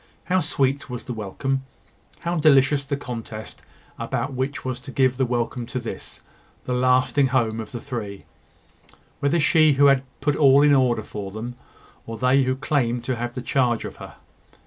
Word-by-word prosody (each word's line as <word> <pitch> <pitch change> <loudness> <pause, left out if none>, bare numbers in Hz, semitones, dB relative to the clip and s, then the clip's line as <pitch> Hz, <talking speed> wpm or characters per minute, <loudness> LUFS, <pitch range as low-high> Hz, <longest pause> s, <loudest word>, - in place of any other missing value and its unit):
How 185 +2 +1
sweet 140 -4 0
was 125 -1 -5
the 125 - -5
welcome! 120 +6 -2 0.6
How 170 +1 -1
delicious 140 -2 +4
the 140 0 -3
contest 115 -5 -7 0.4
about 140 - -2
which 130 +2 -3
was 130 -1 -3
to 135 +1 -10
give 130 -1 +2
the 130 -1 +1
welcome 120 0 -2
to 125 - -3
this, 120 - -7 0.4
the 125 - -3
lasting 130 +2 +3
home 115 -4 0
of 110 - -7
the 120 - -5
three 115 -7 -6 0.9
whether 145 +4 +1
she 155 +1 +5
who 140 +1 +4
had 140 -2 +5 0.2
put 145 +1 +1
all 140 -1 +6
in 145 -1 +5
order 125 -5 +2
for 105 -2 -6
them, 110 +5 -6 0.5
or 115 0 -5
they 125 +4 +3
who 130 0 0
claimed 130 -4 0
to 130 +1 -1
have 120 +1 -4
the 125 - -5
charge 120 -3 +1
of - - -8
her! - - -10
130 Hz, 180 wpm, -23 LUFS, 120-140 Hz, 0.9 s, all